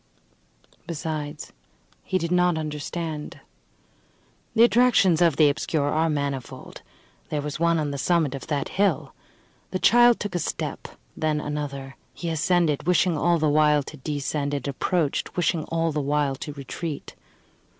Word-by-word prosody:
Besides, 155 Hz, -2 st, -5 dB, 0.5 s
he 185 Hz, -, 0 dB
did 170 Hz, -2 st, -3 dB
not 180 Hz, -2 st, +3 dB
understand. 155 Hz, 0 st, -5 dB, 1.2 s
The 230 Hz, -, +6 dB
attractions 235 Hz, -8 st, +4 dB
of 170 Hz, -4 st, +4 dB
the 150 Hz, 0 st, +5 dB
obscure 145 Hz, 0 st, 0 dB
are 160 Hz, +2 st, +1 dB
manifold. 140 Hz, -4 st, -4 dB, 0.5 s
There 150 Hz, -, -1 dB
was 150 Hz, 0 st, -4 dB
one 170 Hz, 0 st, +3 dB
on 150 Hz, -2 st, -1 dB
the 140 Hz, -, -4 dB
summit 165 Hz, -3 st, +1 dB
of 135 Hz, -, -7 dB
that 145 Hz, -3 st, -2 dB
hill. 195 Hz, -7 st, 0 dB, 0.6 s
The -, -, -2 dB
child 240 Hz, +4 st, +5 dB
took 205 Hz, -2 st, -4 dB
a 175 Hz, -, 0 dB
step, 155 Hz, -, -4 dB, 0.3 s
then 155 Hz, -1 st, 0 dB
another; 140 Hz, -3 st, -5 dB, 0.2 s
he 170 Hz, -, -4 dB
ascended, 165 Hz, -2 st, +1 dB
wishing 180 Hz, 0 st, +3 dB
all 170 Hz, +3 st, +2 dB
the 155 Hz, -1 st, +1 dB
while 150 Hz, 0 st, +4 dB
to 150 Hz, -, -10 dB
descend; 145 Hz, 0 st, -2 dB
and 140 Hz, -, -4 dB
approached, 150 Hz, +4 st, -1 dB
wishing 170 Hz, -2 st, +1 dB
all 165 Hz, 0 st, 0 dB
the 150 Hz, 0 st, -1 dB
while 145 Hz, 0 st, +1 dB
to 135 Hz, +3 st, -6 dB
retreat. 145 Hz, +2 st, -6 dB
155 Hz, 150 wpm, -25 LUFS, 145-170 Hz, 1.2 s, The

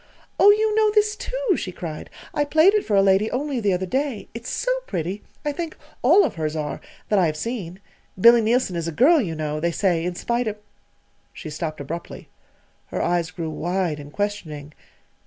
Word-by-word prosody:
"Oh, 405 Hz, -, +8 dB
you 430 Hz, +1 st, +4 dB
know 435 Hz, 0 st, +4 dB
this, 420 Hz, 0 st, +3 dB
too!" -, -, -1 dB
she 185 Hz, -, -4 dB
cried. 160 Hz, -4 st, -7 dB, 0.2 s
"I 295 Hz, -, +1 dB
played 315 Hz, +6 st, +5 dB
it 425 Hz, -, +2 dB
for 210 Hz, -, 0 dB
a 195 Hz, -, +5 dB
lady 195 Hz, +2 st, +3 dB
only 275 Hz, 0 st, -2 dB
the 205 Hz, -3 st, +1 dB
other 185 Hz, +1 st, -1 dB
day. 265 Hz, +2 st, -2 dB
It's 230 Hz, +2 st, -7 dB
so -, -, -1 dB, 0.2 s
pretty, 180 Hz, +5 st, -3 dB, 0.2 s
I 295 Hz, -, +1 dB
think 330 Hz, +1 st, -5 dB, 0.2 s
all 340 Hz, +11 st, +6 dB
of -, -, -2 dB
hers 155 Hz, -1 st, -3 dB
are, 150 Hz, -2 st, -4 dB, 0.3 s
that 210 Hz, -, +3 dB
I 180 Hz, -, +4 dB
have 155 Hz, -1 st, -3 dB
seen. 190 Hz, -2 st, -5 dB, 0.4 s
Billy 235 Hz, +4 st, +7 dB
Neilson 225 Hz, -4 st, +1 dB
is 170 Hz, -1 st, -2 dB
a -, -, -2 dB
girl, 290 Hz, -, +5 dB
you 170 Hz, -8 st, -3 dB
know, 155 Hz, -1 st, -3 dB
they 170 Hz, +2 st, +1 dB
say, 170 Hz, -1 st, +1 dB
in 180 Hz, 0 st, -2 dB
spite 235 Hz, +5 st, -1 dB
of 215 Hz, -1 st, -3 dB, 0.4 s
" -, -, -41 dB
She 155 Hz, -, -8 dB
stopped 155 Hz, 0 st, -4 dB
abruptly. 165 Hz, +5 st, -7 dB, 0.6 s
Her -, -, -4 dB
eyes 175 Hz, -2 st, 0 dB
grew 165 Hz, -3 st, -5 dB
wide 175 Hz, -1 st, -1 dB
and 145 Hz, 0 st, -10 dB
questioning. 155 Hz, -7 st, -4 dB
195 Hz, 205 wpm, -23 LUFS, 165-275 Hz, 0.6 s, Oh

